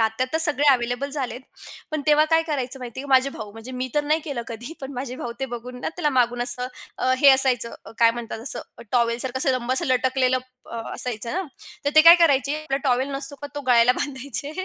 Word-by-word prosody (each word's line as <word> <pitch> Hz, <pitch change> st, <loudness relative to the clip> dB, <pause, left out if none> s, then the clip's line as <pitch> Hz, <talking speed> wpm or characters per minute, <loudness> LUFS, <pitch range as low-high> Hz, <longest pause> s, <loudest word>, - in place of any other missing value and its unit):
आत्ता 220 Hz, +3 st, 0 dB
तर 320 Hz, -, +1 dB
सगळे 295 Hz, -3 st, +5 dB
अवेलेबल 245 Hz, +2 st, -2 dB
झालेत, 255 Hz, -4 st, -3 dB, 0.5 s
पण 310 Hz, -, -2 dB
तेव्हा 300 Hz, 0 st, +5 dB
काय 325 Hz, 0 st, +4 dB
करायचं 270 Hz, -4 st, -2 dB
माहिती 250 Hz, 0 st, -8 dB
आहे 280 Hz, -, -9 dB
का? -, -, -14 dB
माझे 265 Hz, +1 st, +4 dB
भाऊ 210 Hz, -5 st, -9 dB
म्हणजे 225 Hz, +4 st, -10 dB
मी 255 Hz, 0 st, -4 dB
तर 295 Hz, 0 st, +1 dB
नाही 310 Hz, +2 st, +1 dB
केलं 275 Hz, -6 st, -4 dB
कधी. 240 Hz, +6 st, -7 dB
पण 270 Hz, 0 st, -7 dB
माझे 255 Hz, 0 st, -6 dB
भाऊ 240 Hz, -2 st, -6 dB
ते 270 Hz, -, -1 dB
बघून 250 Hz, +1 st, -8 dB
ना, -, -, -3 dB
त्याला 330 Hz, -4 st, 0 dB
मागून 245 Hz, -2 st, +1 dB
असं 250 Hz, 0 st, +2 dB, 0.3 s
अ, 255 Hz, -, +1 dB
हे 280 Hz, -, +6 dB
असायचं 260 Hz, -3 st, +4 dB
अ, -, -, -12 dB
काय 230 Hz, -1 st, +5 dB
म्हणतात? 230 Hz, -1 st, -7 dB
असं 245 Hz, -, -3 dB, 0.3 s
टॉवेलसारखं 240 Hz, +1 st, +2 dB
असं 265 Hz, -, +2 dB
लांब 255 Hz, -1 st, -1 dB
असं 260 Hz, -, +2 dB
लटकलेलं 255 Hz, 0 st, +1 dB, 0.3 s
अ, 235 Hz, -, -6 dB, 0.2 s
असायचं 235 Hz, -2 st, 0 dB
ना. 375 Hz, +3 st, -2 dB, 0.4 s
तर 285 Hz, -, +1 dB
ते 310 Hz, -, +8 dB
काय 335 Hz, +1 st, +10 dB
करायचे, 285 Hz, -4 st, +2 dB
आपला 275 Hz, -3 st, -2 dB
टॉवेल 260 Hz, +1 st, +1 dB
नसतो 275 Hz, +1 st, -3 dB
का? -, -, -4 dB
तो 290 Hz, -, -4 dB
गळ्याला 245 Hz, 0 st, +5 dB
बांधायचे 275 Hz, 0 st, -4 dB
260 Hz, 225 wpm, -23 LUFS, 240-280 Hz, 0.5 s, काय